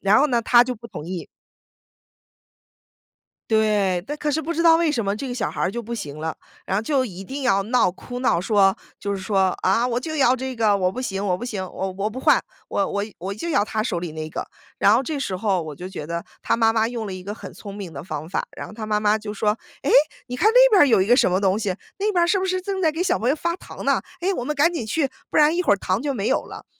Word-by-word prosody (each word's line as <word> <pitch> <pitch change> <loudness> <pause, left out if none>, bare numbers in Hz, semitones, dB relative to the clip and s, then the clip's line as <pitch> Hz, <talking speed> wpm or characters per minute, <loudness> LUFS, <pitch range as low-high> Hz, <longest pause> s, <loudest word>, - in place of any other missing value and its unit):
“然 200 +2 +4
后 295 - +4
呢， 240 -3 +2
他 240 +1 +5
就 250 0 -3
不 235 +1 -11
同 150 - -8
意。 180 -1 -5 2.2
对， 210 -5 +2
但 295 +5 -5
可 300 - -2
是 300 +2 0
不 330 +2 -3
知 335 - 0
道 330 -1 +7
为 330 -2 +2
什 230 -7 -1
么 200 +1 0
这 245 - -5
个 250 - -4
小 245 -3 -2
孩 - - -5
儿 - - +1
就 235 - -4
不 235 +1 -5
行 150 -8 -6
了， 160 +1 -3 0.3
然 190 - 0
后 - - 0
就 265 +2 +1
一 190 -4 -8
定 270 +7 -6
要 200 -6 +3
闹 235 0 +3
哭 245 +7 -8
闹， 245 -9 +2
说 195 -1 +3 0.2
就 200 0 -2
是 195 - -6
说： 190 -1 +1
“啊， 230 +6 +3
我 240 -1 -1
就 315 +5 -3
要 260 -2 +4
这 260 +1 -4
个， 220 -4 +3
我 185 -2 +1
不 250 - -5
行 195 -5 -3
我 180 -2 +1
不 240 - -6
行， 210 -6 -3
我 190 +1 -4
我 200 +2 -1
不 240 +4 -7
换， - - +4 0.2
我 200 - 0
我 200 - -2 0.2
我 190 +3 -4
就 215 +12 -6
要 285 -12 +2
他 215 +1 -2
手 195 -7 -1
里 170 -2 -5
那 155 0 -5
个。” - - -4 0.3
然 200 - +5
后 235 - +4
这 290 +2 -3
时 265 -8 -3
候 195 -2 +1
我 155 -1 -7
就 180 +6 -8
觉 185 -5 -7
得， 170 +2 -4 0.2
他 - - +1
妈 225 -1 +3
妈 225 0 +2
用 235 -2 -4
了 195 - -5
一 185 -1 -8
个 200 +2 -5
很 220 - -10
聪 200 -2 -9
明 195 -5 -7
的 140 - -7
方 155 -3 -5
法， - - -1
然 - - -6
后 - - -11
他 215 0 -6
妈 210 -1 +1
妈 210 0 +3
就 210 -1 -6
说： 210 +1 0 0.2
“哎， 280 - -1 0.4
你 250 - -4
看 415 +12 +4
那 - - +8
边 405 -6 +6
儿 - - +8
有 225 -8 +4
一 190 - +1
个 240 - +6
什 215 - +3
么 185 - +2
东 195 0 +2
西， 205 -4 -1 0.3
那 420 +2 +1
边 355 -3 +3
儿 - - -3
是 390 - +3
不 380 - -1
是 370 0 -1
正 380 0 -3
在 320 - +3
给 320 +3 -3
小 365 0 +2
朋 240 - 0
友 280 - +3
发 340 +2 -1
糖 - - -10
呢， - - +2 0.2
哎， 375 +3 0
我 245 - -3
们 300 +4 -2
赶 300 +4 +3
紧 270 -10 -3
去， 275 +5 0 0.2
不 - - -1
然 300 +2 +5
一 360 - +1
会 - - +3
儿 200 - +4
糖 190 +2 -1
就 285 0 -1
没 210 -4 -2
有 - - +1
了。 - - -10
220 Hz, 310 characters per minute, -23 LUFS, 195-275 Hz, 2.2 s, 那